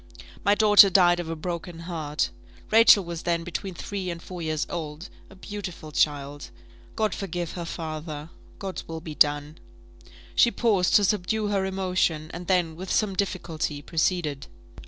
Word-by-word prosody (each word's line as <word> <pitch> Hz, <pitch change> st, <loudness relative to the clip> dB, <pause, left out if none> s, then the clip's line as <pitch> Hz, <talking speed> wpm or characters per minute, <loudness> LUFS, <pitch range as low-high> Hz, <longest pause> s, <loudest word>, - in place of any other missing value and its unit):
My 205 Hz, -, +4 dB
daughter 205 Hz, -2 st, +8 dB
died 175 Hz, -2 st, +5 dB
of 170 Hz, -2 st, -4 dB
a 165 Hz, -, -2 dB
broken 170 Hz, +1 st, -5 dB
heart. 160 Hz, -3 st, -2 dB, 0.4 s
Rachel 220 Hz, -2 st, +7 dB
was 170 Hz, -1 st, -5 dB
then 170 Hz, -1 st, 0 dB
between 180 Hz, +2 st, -5 dB
three 190 Hz, +1 st, -4 dB
and 170 Hz, -1 st, -4 dB
four 180 Hz, 0 st, -8 dB
years 155 Hz, -2 st, -1 dB
old; 160 Hz, +1 st, -6 dB, 0.2 s
a 195 Hz, -, -15 dB
beautiful 185 Hz, -5 st, -7 dB
child. 145 Hz, -1 st, -1 dB, 0.5 s
God 215 Hz, -1 st, 0 dB
forgive 175 Hz, -3 st, -4 dB
her 175 Hz, -2 st, -5 dB
father! 155 Hz, -1 st, -6 dB, 0.3 s
God's 195 Hz, -2 st, -6 dB
will 160 Hz, 0 st, -5 dB
be 160 Hz, -1 st, -8 dB
done!" 145 Hz, +1 st, +2 dB, 0.7 s
She 235 Hz, -, +5 dB
paused 210 Hz, -7 st, +2 dB
to 205 Hz, -, +6 dB
subdue 210 Hz, +2 st, 0 dB
her 195 Hz, -2 st, 0 dB
emotion, 180 Hz, -5 st, -1 dB
and 175 Hz, +1 st, -7 dB
then, 175 Hz, -4 st, +1 dB
with 185 Hz, +3 st, -6 dB
some 210 Hz, -3 st, +1 dB
difficulty, 165 Hz, -6 st, -2 dB
proceeded. 160 Hz, -4 st, -1 dB
175 Hz, 155 wpm, -26 LUFS, 160-195 Hz, 0.7 s, daughter